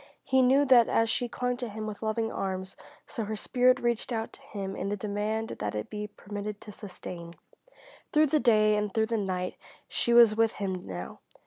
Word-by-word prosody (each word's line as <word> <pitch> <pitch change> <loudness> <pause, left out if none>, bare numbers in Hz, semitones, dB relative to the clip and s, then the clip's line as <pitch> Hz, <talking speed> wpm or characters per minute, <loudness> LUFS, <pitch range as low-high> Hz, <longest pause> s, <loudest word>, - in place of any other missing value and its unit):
He 265 0 +3
knew 265 +3 +5
that 250 -4 +6
as 225 0 +2
she 245 +1 -1
clung 250 +1 -2
to 245 -2 -4
him 215 +1 -5
with 210 -1 -6
loving 225 +1 -1
arms, 190 -1 -4 0.3
so 225 - -4
her 215 +1 -3
spirit 255 +4 +3
reached 240 0 -1
out 225 -1 -3
to - - -15
him 195 -2 -6
in 195 - -3
the 205 - -2
demand 210 +2 -2
that 105 0 -3
it 105 - -4
be 210 0 -4
permitted 205 0 -6
to 210 - -9
sustain. 175 -4 -8 0.8
Through 305 +1 +5
the 305 - +5
day 215 -4 +4
and 210 -1 -1
through 220 +2 +2
the 230 0 -1
night 185 -2 -2 0.3
she 235 - -1
was 235 -2 +7
with 225 0 +3
him 190 -3 -4
now. 90 -1 -6
215 Hz, 205 wpm, -29 LUFS, 200-235 Hz, 0.8 s, was